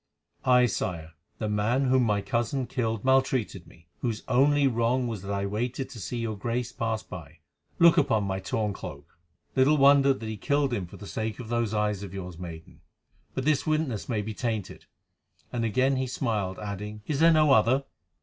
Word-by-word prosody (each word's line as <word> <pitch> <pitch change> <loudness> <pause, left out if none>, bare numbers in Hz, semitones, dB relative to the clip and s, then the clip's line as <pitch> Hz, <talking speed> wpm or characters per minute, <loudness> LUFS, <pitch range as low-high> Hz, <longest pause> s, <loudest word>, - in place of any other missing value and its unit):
"Aye, 125 -1 +6
Sire. 85 -7 -3 0.2
The 110 - -2
man 105 +6 +1
whom 130 0 +3
my 105 -2 +1
cousin 125 +2 -1
killed 115 -3 -2
maltreated 130 -8 +1
me, 85 - -19
whose 115 -3 -3
only 140 +3 +4
wrong 120 0 +1
was 110 -5 -4
that 100 +1 -6
I 100 0 -1
waited 120 +6 -3
to 115 - -9
see 120 +4 -4
your 115 -2 -2
Grace 120 +4 -2
pass 115 -1 -2
by. 80 -4 -10 0.4
Look 170 0 +6
on 110 -2 +2
my 95 -1 -2
torn 105 +1 -2
cloak." 70 -5 -9 0.4
"Little 140 +3 +4
wonder 140 0 +6
that 130 -4 -3
he 110 -1 -4
killed 140 +3 +1
him 100 -6 -2
for - - -12
the 105 - -10
sake 110 +1 -3
of 115 -3 -7
those 115 -2 0
eyes 105 -2 0
of 100 -1 -7
yours, 90 -3 -7
maiden. 80 -3 -9 0.5
But 130 - -2
this 150 0 +1
witness 155 -9 -1
may 110 -4 0
be 110 +1 -5
tainted." 110 -3 -4 0.7
And 120 -1 -1
again 130 +4 +2
he 130 0 -1
smiled, 105 -7 -2
adding, 105 +1 -6
"Is 145 -3 -2
there 165 +1 +6
no 155 -2 +4
other?" 125 +5 +4
115 Hz, 190 wpm, -27 LUFS, 105-130 Hz, 0.7 s, Aye